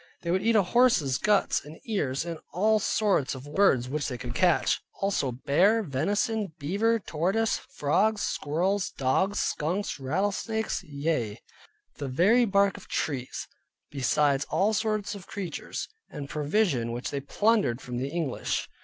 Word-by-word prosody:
They 170 - -1
would 185 +1 +2
eat 225 +2 +2
horse's 200 - +3
guts, 210 -1 +2
and 150 +2 -11
ears, 160 - -1
and 165 -2 -5
all 215 +4 +3
sorts 200 -11 +1
of 130 +1 -9
wild 145 - -10
birds 135 -12 +4
which 145 +2 -2
they 125 - -4
could 120 0 -6
catch; 175 +6 +2 0.2
also 195 -9 0
bear, 185 - +3
venison, 200 - -1
beaver, 200 +10 +1
tortoise, 195 +4 0 0.2
frogs, 205 +9 +2
squirrels, 180 +7 0
dogs, 185 +10 0
skunks, 170 +2 -1
rattlesnakes; 200 +10 -1
yea, 140 - -2 0.6
the 140 - -4
very 200 - +4
bark 200 -2 +2
of - - -13
trees; 130 -5 -3 0.4
besides 140 +1 +1
all 205 +3 +2
sorts 215 -1 -1
of 200 -3 -10
creatures, 190 -7 -5 0.2
and 145 -2 -7
provision 150 - +1
which 120 +2 -4
they 140 - -2
plundered 200 - +1
from 125 -2 -6
the 130 +3 -2
English. 160 -5 -2
170 Hz, 145 wpm, -27 LUFS, 140-205 Hz, 0.6 s, birds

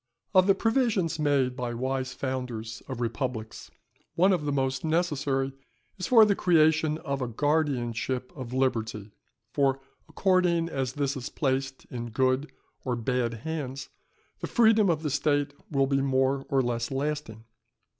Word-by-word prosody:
_ - - -63 0.3
Of 185 -1 +5
the 195 - +5
provisions 225 - +1
made 140 -4 +2
by 120 -2 -3
wise 130 +1 -2
founders 125 -4 -4
of 130 -3 -5
republics, 115 -2 -4 0.5
one 190 +3 +4
of 165 -5 -1
the 145 - 0
most 135 -1 -1
necessary 145 -5 0 0.5
is 185 - -2
for 225 -3 +7
the 205 -1 +2
creation 160 -3 +3
of 140 -3 -4
a 125 - -1
guardianship 130 -2 -1
of 130 -4 -7
liberty; 110 -5 -1 0.4
for 135 -2 +2 0.3
according 180 -3 +2
as 130 -4 -2
this 140 0 -1
is 125 -2 -5
placed 135 -1 -2
in 120 -1 -5
good 130 +5 +1 0.3
or 125 -2 -1
bad 120 0 -1
hands, 135 -4 -4 0.5
the - - -4
freedom 220 -4 +4
of 160 -2 0
the 150 - -1
State 145 0 +1 0.2
will 135 -3 +2
be 135 0 +1
more 135 0 +1
or 135 -1 +2
less 120 -1 -2
lasting. 135 -5 -3
135 Hz, 155 wpm, -27 LUFS, 125-155 Hz, 0.5 s, for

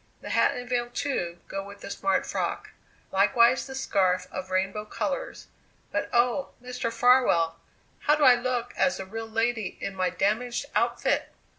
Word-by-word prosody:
The - - -6
hat - - +3
and 245 0 -6
veil, 240 -1 -1
too, 175 -11 -2
go 195 0 -4
with 200 0 -12
the - - -7
smart 195 -1 0
frock; - - -3 0.4
likewise 235 +7 +4
the 265 - -7
scarf 185 -8 +1
of 185 0 -6
rainbow 190 +3 -1
colours. - - -4 0.5
But, - - -1
oh! 245 +3 +1
Mr. 250 -1 -4
Farwell, 230 -10 +3 0.4
how 300 - +3
do 300 - 0
I 255 - +9
look 245 -1 -2
as 275 - +1
a 190 - -5
real 225 +3 -6
lady 225 -2 -1
in 195 - -4
my 185 -1 +1
damaged 220 +8 -1
outfit?" - - +1
230 Hz, 165 wpm, -27 LUFS, 195-250 Hz, 0.5 s, I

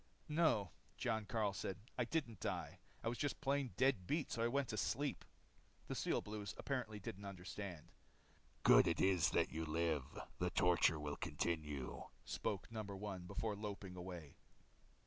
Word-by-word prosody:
"No," 150 - +3 0.3
Jon 110 -3 0
Karyl 105 -4 +1
said. 95 -1 -3 0.2
"I 125 - +1
didn't 125 -6 -1
die. - - -2 0.2
I - - -1
was 120 +1 -1
just 145 - 0
plain 140 -4 +1
dead 130 -8 +3
beat 150 +4 0
so 115 - -1
I 115 - +4
went 135 +1 +1
to 110 - -2
sleep." 140 +8 0 0.6
The - - -3
Steel - - +1
Blues 105 -1 -5
apparently 120 -6 -2
didn't 100 0 -6
understand. 95 -2 -6 0.7
"Good - - +8
it 85 - +2
is 95 -3 +5
that - - +2
you 80 +1 -2
live. 80 -3 0 0.2
The 90 - +2
torture 85 -3 +4
will 75 -1 -3
continue," 75 -4 -2 0.2
spoke 100 +2 -2
No. 110 -1 -2
1 100 -3 -5
before 110 +3 -1
loping 100 -3 -5
away. 90 -5 -7
100 Hz, 160 wpm, -40 LUFS, 90-115 Hz, 0.7 s, Good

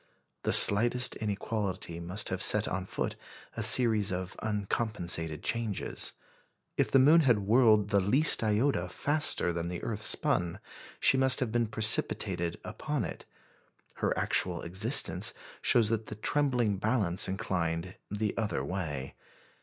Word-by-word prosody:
The - - -2
slightest 120 +5 +7
inequality 100 -4 -5
must 90 +5 0
have 95 0 -4
set 105 0 +6
on 95 0 -5
foot - - -5 0.4
a 115 - -5
series 110 -3 +4
of 90 0 -6
uncompensated 100 -6 -3
changes. 115 -4 -4 0.6
If - - -1
the - - +3
moon 150 +6 +4
had 125 -7 +2
whirled 110 -2 +2
the 100 -2 +1
least 130 - +3
iota 105 -4 -1
faster 145 - 0
than 85 0 -5
the 90 0 -7
earth 110 -2 -5
spun 85 -5 -1 0.4
she 135 - +2
must 130 0 +3
have 125 -4 -3
been 120 0 -1
precipitated 105 -5 +1
upon 135 +2 -5
it. - - -9 0.7
Her - - -2
actual 90 -2 -1
existence 100 +10 +1 0.3
shows 115 -3 +2
that 110 -1 -3
the - - -8
trembling 120 -3 -1
balance 100 -4 -1
inclined 90 -2 -4 0.2
the 105 0 -4
other 110 -2 -3
way. 75 -8 -6
105 Hz, 140 wpm, -28 LUFS, 90-115 Hz, 0.7 s, slightest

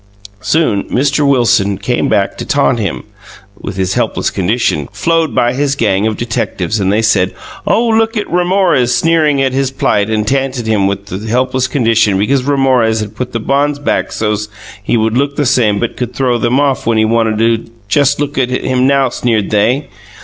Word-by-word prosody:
Soon 110 -4 0
Mr 140 +3 0
Wilson 110 -7 +2
came 120 +5 -1
back 100 -1 0
to - - -3
tant 70 +12 +1
him 100 -5 -3 0.6
with 95 - -7
his 95 -1 -1
helpless - - -1
condition 95 - -1
flowed 165 -7 0
by 120 0 +2
his 140 +1 0
gang 105 -4 +1
of 110 - -2
detectives 110 -3 -2
and 95 -1 +1
they 110 +2 +1
said 95 -4 +1 0.3
Oh 235 +1 +2
look 225 0 +1
at 205 - -1
Ramorez 175 -8 +1
sneering 155 -4 +2
at 130 -1 0
his 135 0 0
plight 110 -6 0
and 110 -1 -1
tanted 135 -2 -1
him 105 -3 +1
with 100 0 -4
his 105 +4 -6
helpless 130 +2 0
condition 115 -6 +2
because 130 +7 +1
Ramorez 130 -5 +1
had 105 0 -6
put 125 +2 -4
the 115 - -3
bonds 140 +5 0
back 145 - -1
sos 105 -1 -2 0.3
he 110 - 0
would 110 0 0
look 140 +2 0
the 145 - 0
same 120 -6 +2
but 120 - -3
could 125 - -4
throw 125 -3 0
them 120 +4 +1
off 140 -5 0
him - - +3
when 115 - +1
he 110 - +3
wanted 110 -1 +1
to 115 0 0 0.2
Just 140 +5 +2
look 145 -1 -2
at 125 -1 +1
him 130 0 0
now 135 -1 +2
sneered 115 -4 -1
they. 120 +7 +1
120 Hz, 195 wpm, -13 LUFS, 110-140 Hz, 0.6 s, him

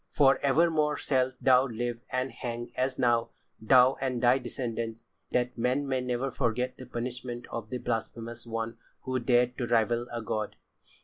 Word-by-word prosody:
For 135 -2 +4
evermore 150 +1 +3
shalt 130 -1 +1
thou 130 0 +5
live 120 0 -3
and 130 +1 -1
hang 120 0 -5
as 130 0 0
now, 120 -2 +2 0.3
thou 125 +3 +5
and 130 -2 -1
thy 125 +2 +4
descendants, 115 -2 -4 0.3
that 125 0 -1
men 130 +4 +1
may 130 -1 0
never 125 +2 -1
forget 125 0 -1
the 130 - -10
punishment 120 0 -5
of 110 -2 -5
the 125 - -2
blasphemous 115 0 -4
one 115 0 -4 0.2
who 130 0 -1
dared 125 +1 +2
to 120 - -1
rival 120 +1 +2
a 120 -1 -4
god." 110 -1 -3
125 Hz, 165 wpm, -29 LUFS, 115-130 Hz, 0.3 s, thou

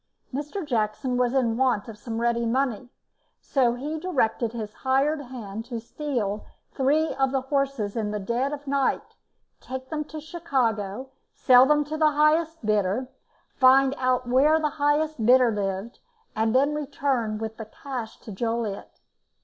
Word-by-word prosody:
Mr. 300 +7 -4
Jackson 240 0 -1
was 245 -1 +2
in 235 -4 +2
want 250 -5 +1
of 225 - -8
some 225 +1 -5
ready 235 0 +1
money, 250 -1 -1 0.5
so 245 -4 +1
he 300 +5 -4
directed 250 -9 0
his 220 -3 -6
hired 275 +4 +1
man 220 -4 -6
to 235 0 -6
steal 230 -5 -3 0.3
three 295 +4 +1
of 270 0 0
his 265 - 0
horses 275 -8 -1
in 220 -3 -1
the 210 0 -3
dead 235 +7 -1
of 290 -1 -6
night, 275 -1 0 0.5
take 260 0 -7
them 305 -1 -1
to 310 +1 -8
Chicago, 260 - -2 0.2
sell 255 0 +6
them 295 0 +3
to 305 +2 -5
the 310 -1 +4
highest 310 -1 +2
bidder, 210 +4 0 0.5
find 265 +1 +6
out 255 -1 +1
where 285 +6 +4
the 305 -1 0
highest 295 -2 0
bidder 250 +1 +5
lived, 200 +1 -3 0.4
and 220 +2 +1
then 280 +3 +3
return 275 -6 -1
with 220 0 -5
the 220 - -6
cash 235 0 -7
to 220 - -9
Joliet. 225 0 -3
255 Hz, 155 wpm, -25 LUFS, 225-285 Hz, 0.5 s, sell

